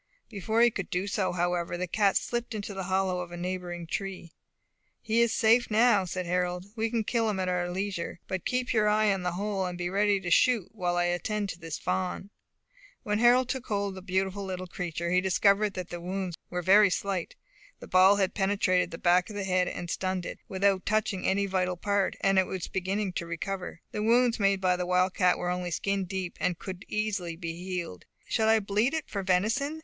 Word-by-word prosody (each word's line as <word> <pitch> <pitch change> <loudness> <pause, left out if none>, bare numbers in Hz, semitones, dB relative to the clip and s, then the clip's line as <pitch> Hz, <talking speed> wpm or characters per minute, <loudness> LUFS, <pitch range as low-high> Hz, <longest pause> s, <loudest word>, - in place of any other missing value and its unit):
Before 220 +3 0
he 240 - +5
could 195 -4 -5
do 180 +2 -1
so, 200 -1 -1
however, 175 0 -1
the 180 - -2
cat 195 +2 +2
slipped 240 -1 -3
into 205 -1 -5
the 190 -1 -4
hollow 190 -1 0
of 180 -1 -6
a 175 - -7
neighbouring 175 -1 -4
tree. 185 -1 -5 0.7
"He 230 +1 +1
is 235 -1 +3
safe 230 +2 +3
now," 215 -3 +4
said 185 0 -4
Harold; 180 +1 -1
"we 225 0 0
can 230 -1 0
kill 225 0 0
him 200 -3 -2
at 185 - -1
our 180 -1 0
leisure. 185 -2 -3
But 185 -2 -3
keep 250 0 -1
your 215 -2 +3
eye 210 -1 +3
on 195 - -3
the 180 -1 -2
hole, 200 +1 -2
and 180 -1 -5
be 175 0 -3
ready 200 0 +2
to 175 -2 -5
shoot, 235 -2 +3
while 180 -5 -1
I 175 - +3
attend 195 +4 -1
to 170 - -6
this 165 -2 -5
fawn." 185 +2 -3 0.7
When 210 0 0
Harold 245 +2 +5
took 260 -1 -4
hold 200 -1 -1
of - - -9
the 190 - -8
beautiful 190 +1 -1
little 185 -1 -4
creature, 170 -1 -4
he 180 0 +4
discovered 200 +2 +2
that 180 -2 -5
the 175 -1 -5
wounds 185 0 -3
were 180 0 -3
very 200 +3 +6
slight. 185 -1 -2 0.4
The - - -10
ball 185 +2 +6
had 195 -2 0
penetrated 190 -3 +1
the 165 - -7
back 180 +2 +3
of 210 - -8
the 205 - -2
head 185 -1 +1
and 175 - -5
stunned 185 +1 -2
it, - - -6
without 195 0 +1
touching 210 -3 0
any 200 +1 +2
vital 185 -2 -1
part, 200 +1 0
and 195 -1 +4
it 190 - +2
was 185 -2 -4
beginning 190 +1 -2
to 170 - -4
recover; 180 +1 -5
the 210 - -3
wounds 235 +2 +3
made 195 -1 +3
by 180 -1 +3
the 180 0 -3
wildcat 180 0 +2
were 180 - -2
only 180 0 -2
skin 195 +3 -1
deep, 185 -1 -4
and 180 -2 0
could 185 +1 -8
easily 205 -6 -2
be 165 -1 -5
healed. 180 - -5 0.2
"Shall 220 -1 +1
I 225 0 +5
bleed 210 +8 0
it 315 - -3
for 200 - -3
venison?" 220 +12 0
190 Hz, 215 wpm, -28 LUFS, 180-210 Hz, 0.7 s, very